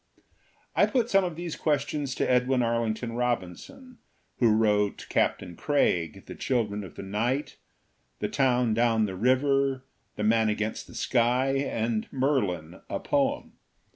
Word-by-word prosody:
I - - +5
put 245 -4 0
some 195 0 +5
of 175 -3 -3
these 170 -1 -5
questions 145 -2 -1
to - - 0
Edwin 125 0 +2
Arling 115 -1 0
ton 115 +1 -6
Robinson, 125 - -4 0.4
who 120 - +5
wrote 105 -2 +2
Captain 90 -2 0
Craig, 95 - 0
The - - -8
Chil 125 -4 0
dren 105 0 -5
of 90 -6 -11
the - - -7
Night, 115 +9 -2 0.6
The - - -2
Town 125 -4 +2
Down 115 -1 +2
the 95 -2 -5
River, 135 +4 +2 0.3
The 105 - -3
Man 110 0 +3
Against 105 +1 -3
the - - -13
Sky 125 +2 +2
and 115 -5 -2
Merlin: 100 - -1
A - - -2
Poem. 285 0 -1
120 Hz, 150 wpm, -27 LUFS, 105-135 Hz, 0.6 s, I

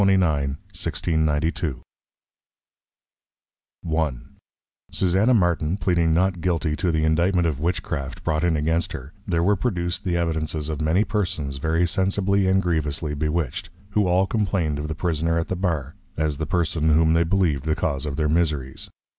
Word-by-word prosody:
1692. 80 -3 0 2.1
I. 80 -2 +1 0.8
Susanna 95 +7 +2
Martin, 85 -3 +1
pleading 85 -4 +2
Not 90 +1 +1
Guilty 80 -3 0
to 90 - 0
the 80 -1 0
Indictment 85 +3 +2
of 75 -4 -1
Witchcraft, 85 -4 -3
brought 75 +1 0
in 85 -3 +2
against 80 +3 0
her, 70 +5 -8
there 85 -3 +1
were 100 +3 +4
produced 90 -5 -2
the 90 -3 0
Evidences 80 -2 -2
of 75 -1 -3
many 80 +7 +3
Persons 90 -10 -2
very 80 +4 +1
sensibly 95 +2 +1
and 95 +1 +3
grievously 75 -3 -1
Bewitched; 75 -1 -2 0.2
who 105 -2 +2
all 90 +2 +3
complained 95 -8 0
of 75 - -3
the 80 - -4
Prisoner 80 0 0
at 80 - -2
the 95 - -1
Bar, 80 -6 -2 0.2
as 75 -2 0
the 80 - -3
Person 80 -2 0
whom 80 0 +4
they 85 +1 +4
believed 80 -6 +1
the 80 0 +1
cause 75 -5 -2
of 70 - -3
their 75 +1 0
Miseries. 75 -5 -1
80 Hz, 155 wpm, -23 LUFS, 75-90 Hz, 2.1 s, were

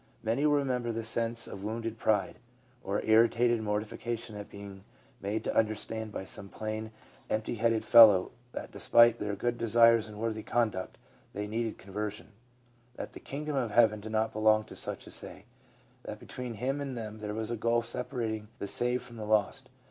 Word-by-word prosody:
Many 120 +7 +1
will 145 - +4
remember 125 -4 0
the 115 0 -3
sense 115 +1 +2
of 100 - -7
wounded 115 +1 -4
pride, 105 -3 +1 0.4
of 100 +1 -2
irritated 115 +1 +4
mor 105 -1 0
tification 115 +1 -6
at 105 0 -8
being 100 -1 -10 0.4
made 105 +2 -2
to - - -2
understand 110 0 -1
by 95 - -5
some 100 +1 -6
plain, 110 +1 -5 0.4
empty 110 +2 -1
headed 115 -1 +1
fellow 110 -6 +8 0.2
that, - - -7
despite 120 0 +5
their 105 -1 -2
good 120 +3 -2
desires 115 0 +5
and 105 -1 -10
worthy 110 0 -2
conduct, 110 -6 -1 0.4
they 105 +1 -3
needed 110 +1 -3
conversion; 105 +3 -6 0.6
that - - -6
the - - -9
kingdom 150 +1 -5
of 125 -4 0
heaven 110 -1 +4
did 110 +1 -8
not 110 0 0
belong 110 0 +3
to - - -12
such - - -3
as - - +2
they; - - -11 0.6
that 105 - -7
between 125 +2 -7
him 135 +6 -2
and 135 -3 -4
them 110 -1 -6
there 105 0 -4
was 110 0 -3
the 120 - -1
gulf 115 +1 +1
separating 115 -4 -3
the - - -4
saved 125 +4 0
from 120 - -11
the 110 - -5
lost. 105 -2 +1
110 Hz, 185 wpm, -30 LUFS, 105-120 Hz, 0.6 s, fellow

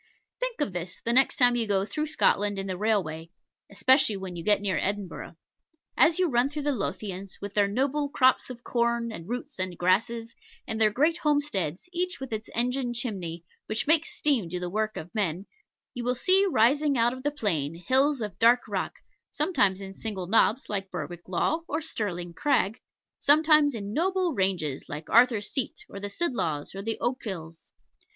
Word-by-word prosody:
Think - - -2
of 205 - -1
this 175 0 -5
the 235 - +2
next 265 +2 +4
time 245 -1 +4
you 230 -2 0
go 195 -1 +1
through 300 +10 -3
Scotland 205 -9 +2
in 195 - -3
the 190 -1 -3
railway, 180 -6 -1 0.4
especially 240 +2 +3
when 190 -2 -7
you 170 - -6
get 210 +2 +3
near 195 -5 -1
Edinburgh. 200 -2 -4 0.6
As 325 +1 +5
you 370 -1 +3
run 250 -2 +2
through 295 0 -5
the 290 - +1
Lothians, 195 -5 -4
with 200 0 -7
their 205 -1 +3
noble 275 +7 0
crops 260 -2 +3
of 245 -1 -9
corn, 235 -1 0
and 170 -3 -8
roots, 250 +1 -5
and 185 -2 -2
grasses 225 +6 0 0.3
and 220 -2 -3
their 215 - +6
great 300 +10 +1
homesteads, 290 - -1
each 360 +1 0
with 265 -3 -6
its 215 0 -4
engine 245 +1 0
chimney, 180 -9 -4 0.2
which 215 +1 -1
makes 315 +1 +2
steam 255 - +1
do 180 +1 -3
the 175 0 -4
work 215 +2 -1
of 165 +6 -8
men 195 -4 -1 0.5
you 245 - -5
will 250 +1 0
see 380 +9 +4
rising 285 +1 +3
out 235 +1 +3
of 260 - -8
the 290 - 0
plain, 165 - -1
hills 260 - +2
of 205 -4 -5
dark 235 +2 +5
rock, - - -3 0.4
sometimes 205 - +1
in 195 0 -7
single 195 -3 -5
knobs, 225 +5 +2
like 195 -2 -3
Berwick 175 -2 -7
Law 315 - 0
or - - -1
Stirling 190 - -4
Crag 245 -2 0 0.4
sometimes 300 -1 +5
in 205 -1 -5
noble 365 +2 +1
ranges, 180 - -1
like 150 +2 -7
Arthur's 230 -3 +4
Seat, 265 -4 -2
or 200 - -9
the 205 0 -4
Sidlaws, 200 - -2
or 195 - -6
the 225 +2 -2
Ochils. 190 -10 -5
225 Hz, 185 wpm, -27 LUFS, 190-270 Hz, 0.6 s, their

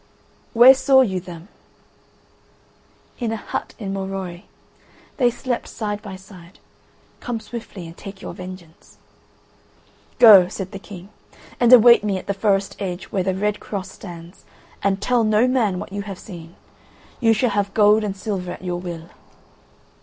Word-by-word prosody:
"Where 245 +3 +9
saw 265 0 +4
you 190 -7 0
them?" 175 -1 -11 1.7
"In 235 -3 -2
a - - -1
hut 220 - -6
in 195 -3 -5
Morois, 190 -2 -5 0.8
they 245 -3 +3
slept 245 0 -4
side 210 -2 -4
by 200 -3 -8
side. 185 -2 -15 0.6
Come 240 -2 -4
swiftly 220 -4 -9
and 165 0 -11
take 195 +1 -10
your - - -8
vengeance." 180 -3 -12 1.2
"Go," 205 -7 +9
said 190 +1 -6
the 195 - -7
King, 195 -2 -11 0.5
"and 240 0 +4
await 240 -2 +8
me 200 -2 -1
at - - -8
the 200 - -1
forest 195 -1 0
edge 185 -2 -5
where 195 - 0
the 185 0 -1
red 210 +2 -1
cross 195 -2 -6
stands, 170 -1 -12 0.4
and 195 0 0
tell 245 -2 +2
no 215 +3 +3
man 230 -8 +1
what 185 - -7
you 200 - -3
have 200 -2 -7
seen. 170 -4 -11 0.6
You 230 -3 +3
shall 225 +2 +1
have 200 -1 -1
gold 210 0 +5
and 200 -2 -4
silver 190 -3 -4
at - - -12
your 175 -1 -3
will." 170 -2 -8
200 Hz, 160 wpm, -21 LUFS, 185-220 Hz, 1.7 s, Where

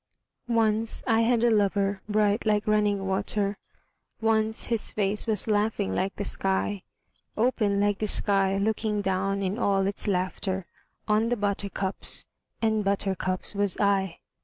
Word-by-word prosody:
Once 225 -1 +2
I 225 -2 +3
had 235 0 +2
a 240 - +4
lover 200 -2 +1
bright 210 0 +2
like 210 -1 +1
running 210 -2 +1
water, 200 +1 -1 0.6
Once 220 -1 +1
his 230 -3 0
face 210 +2 0
was 215 -2 -1
laughing 210 - 0
like 190 - -1
the 205 - -3
sky; 195 +1 0 0.6
Open 215 -4 +1
like 205 0 +1
the 215 - -1
sky 195 -1 +2
looking 210 0 0
down 195 +1 -1
in 195 +4 -2
all 195 -4 +2
its 200 +1 -1
laughter 190 0 -1 0.4
On 215 +2 +2
the 245 - 0
buttercups 200 -1 -1 0.4
and 220 -1 +2
buttercups 195 -2 -1
was 200 -2 0
I. 195 -3 +1
205 Hz, 140 wpm, -26 LUFS, 195-215 Hz, 0.6 s, a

